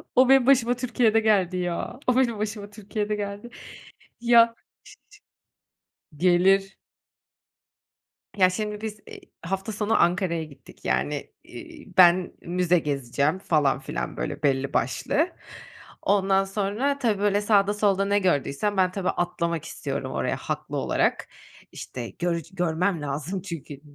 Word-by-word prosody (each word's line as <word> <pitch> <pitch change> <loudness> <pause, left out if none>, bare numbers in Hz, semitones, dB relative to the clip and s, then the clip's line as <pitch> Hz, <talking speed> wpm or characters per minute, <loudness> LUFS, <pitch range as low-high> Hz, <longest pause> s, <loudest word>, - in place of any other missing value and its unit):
O 255 +1 +5
benim 270 -2 +6
başıma 250 -3 +4
Türkiye'de 235 -2 +2
geldi 195 -5 +2
ya. 180 +7 -3
O 250 - +3
benim 235 -5 +1
başıma 210 -1 -4
Türkiye'de 210 0 -4
geldi. 205 +3 -5 0.7
Ya 235 -1 +5 1.6
ş 150 - -18
ç - - -18
gelir. 190 +2 +3 1.6
Ya 185 -1 +5
şimdi 210 +2 -4
biz, 215 -1 -5
eee, - - -11 0.2
hafta 195 +4 -3
sonu 210 +1 +1
Ankara'ya 175 -2 +1
gittik. 140 -4 -15
Yani, - - -1
iii, - - -12
ben 180 0 +6
müze 180 0 +1
gezeceğim 140 +3 -1
falan 150 -7 +1
filan - - -5
böyle - - -4
belli 140 -1 +1
başlı. 310 - 0 0.7
Ondan 195 -1 +2
sonra, 210 +8 -1
tabii 220 -6 0
böyle 205 0 +2
sağda 205 -1 +3
solda 200 -2 +1
ne 205 +1 +2
gördüysem, 185 +3 0
ben 185 -1 +3
tabii 185 -1 -2
atlamak 170 -2 -2
istiyorum - - -5
oraya - - -1
haklı - - -4
olarak. - - 0 0.4
İşte, 120 -3 -7
görc 170 -2 -3
görmem 175 0 0
lazım 150 +6 -4
çünkü. 155 -6 -8
195 Hz, 135 wpm, -25 LUFS, 170-210 Hz, 1.6 s, benim